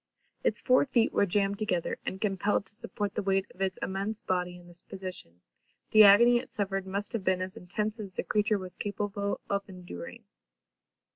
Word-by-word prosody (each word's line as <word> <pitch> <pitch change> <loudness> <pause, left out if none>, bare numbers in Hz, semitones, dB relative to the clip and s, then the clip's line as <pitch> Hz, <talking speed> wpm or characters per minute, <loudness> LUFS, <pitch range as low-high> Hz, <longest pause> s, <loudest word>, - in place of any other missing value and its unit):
Its - - +1
four 255 0 +4
feet 235 -3 +2
were 200 - +3
jammed 200 +1 +1
together; 185 -6 -1
and, 190 - -3
compelled 200 0 0
to 190 - -12
support 210 -3 -4
the 215 - -1
weight 195 -1 +1
of 185 - -13
its 190 -1 0
immense 200 +3 -2
body 180 -1 -2
in 175 - -15
this 175 0 -13
position, 185 - -8 0.5
the 215 0 +9
agony 235 +4 +8
it 250 +2 -5
suffered 195 -2 -2
must 200 +3 -3
have 225 -4 -2
been 185 -1 +2
as 185 0 -4
intense 210 +5 -3
as 195 -3 -7
the - - -2
creature 210 0 +1
was 185 -2 -7
capable 205 0 -3
of 200 0 0
enduring. 180 - -9
200 Hz, 190 wpm, -29 LUFS, 185-210 Hz, 0.5 s, the